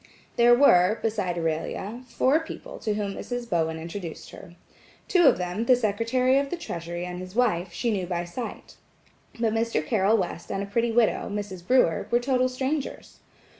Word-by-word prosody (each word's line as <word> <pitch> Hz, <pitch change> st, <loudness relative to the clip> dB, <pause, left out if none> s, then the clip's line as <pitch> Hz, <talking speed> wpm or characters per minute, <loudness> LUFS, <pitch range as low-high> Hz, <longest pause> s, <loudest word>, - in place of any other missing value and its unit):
There 240 Hz, 0 st, +6 dB
were, 215 Hz, -6 st, +5 dB
beside 205 Hz, -6 st, -1 dB
Aurelia, 170 Hz, +7 st, -3 dB
four 270 Hz, +5 st, +2 dB
people 325 Hz, -, -9 dB
to 215 Hz, -1 st, -1 dB
whom 205 Hz, -2 st, -2 dB
Mrs. 245 Hz, +2 st, -5 dB
Bowen 160 Hz, -4 st, 0 dB
introduced 165 Hz, +1 st, -7 dB
her. 175 Hz, -2 st, -12 dB, 0.5 s
Two 350 Hz, -5 st, +5 dB
of -, -, +5 dB
them, 180 Hz, +5 st, -3 dB
the 255 Hz, -, +6 dB
Secretary 245 Hz, +4 st, +1 dB
of 280 Hz, 0 st, -2 dB
the 355 Hz, -, -3 dB
Treasury 175 Hz, -, -5 dB
and 180 Hz, 0 st, -6 dB
his 185 Hz, +2 st, -9 dB
wife–she 210 Hz, -2 st, 0 dB
knew 190 Hz, -4 st, -2 dB
by 175 Hz, -1 st, -2 dB
sight, 230 Hz, +8 st, -7 dB, 0.6 s
but 225 Hz, -2 st, +1 dB
Mr. 225 Hz, -9 st, 0 dB
Carroll 210 Hz, +4 st, +3 dB
West 175 Hz, -3 st, -4 dB
and 195 Hz, -, -2 dB
a -, -, -4 dB
pretty 230 Hz, +4 st, 0 dB
widow, 230 Hz, -1 st, +2 dB
Mrs. 200 Hz, -4 st, -6 dB
Brewer, 250 Hz, -10 st, +3 dB
were 240 Hz, -, +3 dB
total 255 Hz, 0 st, +1 dB
strangers. 265 Hz, +3 st, -4 dB
210 Hz, 170 wpm, -26 LUFS, 180-245 Hz, 0.6 s, There